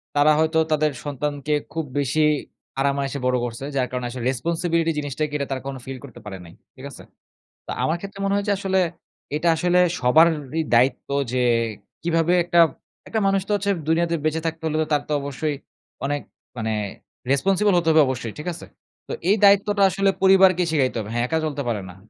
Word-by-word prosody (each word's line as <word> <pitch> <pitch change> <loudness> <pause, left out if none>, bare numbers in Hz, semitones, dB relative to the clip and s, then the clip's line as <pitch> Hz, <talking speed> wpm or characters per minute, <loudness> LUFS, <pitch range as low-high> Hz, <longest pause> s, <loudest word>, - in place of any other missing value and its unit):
তারা 145 +1 +5
হয়তো 160 +1 +2
তাদের 155 0 +2
সন্তানকে 145 +1 -3 0.2
খুব 160 -1 -3
বেশি 140 +3 0 0.6
আরাম 140 0 +1
আয়েশে 140 +1 -3
বড় 125 0 +2
করছে। 120 +2 -6
যার 130 -2 +1
কারণে 125 -1 -3
আসলে 120 -1 -6
responsibility 165 +4 0
জিনিসটা 145 +1 -3
কি, 145 - -14
এটা 140 - -3
তারা 130 -1 -2
কখনো 135 -1 -5
feel 135 0 -6
করতে - - -11
পারে 95 -2 -6
নাই, 85 - -14 0.2
ঠিক 130 +1 -11
আছে? - - -12 0.6
তা - - -6
আমার 160 - +1
ক্ষেত্রে 200 +1 -9
মনে 195 0 +1
হয়েছে 205 0 0
আসলে, 190 -1 0 0.6
এটা 170 +2 +1
আসলে 175 +2 +2 0.2
সবারই 155 +3 +3
দায়িত্ব 125 +2 +2 0.2
যে, 130 - 0 0.6
কিভাবে 165 0 +1
একটা 175 0 +1 0.5
একটা 220 - -1
মানুষ 195 0 +2
তো - - 0
হচ্ছে 200 0 -1 0.2
দুনিয়াতে 170 +1 +2
বেঁচে 155 +1 0
থাকতে 160 0 -4
হলে 155 -1 -1
তো - - -2
তার 145 - +2
তো - - -2
অবশ্যই 140 +2 -3 0.5
অনেক 145 +1 -1 0.4
মানে 110 0 -1 0.6
responsible 195 +7 +2
হতে 170 -1 -1
হবে 160 0 +6
অবশ্যই, 125 -4 -3
ঠিক 150 - -7
আছে? 170 - -10 0.4
তো - - -4 0.2
এই 205 - +5
দায়িত্বটা 200 0 +4
আসলে 195 +1 +2
পরিবারকে 190 -2 +6
শিখাইতে 130 -5 +1
হবে। 105 0 -6
হ্যাঁ 120 0 +1
একা 160 - +1
চলতে 145 -2 -2
পারে 110 -3 -1
না। - - -12
155 Hz, 190 wpm, -23 LUFS, 135-175 Hz, 0.6 s, হবে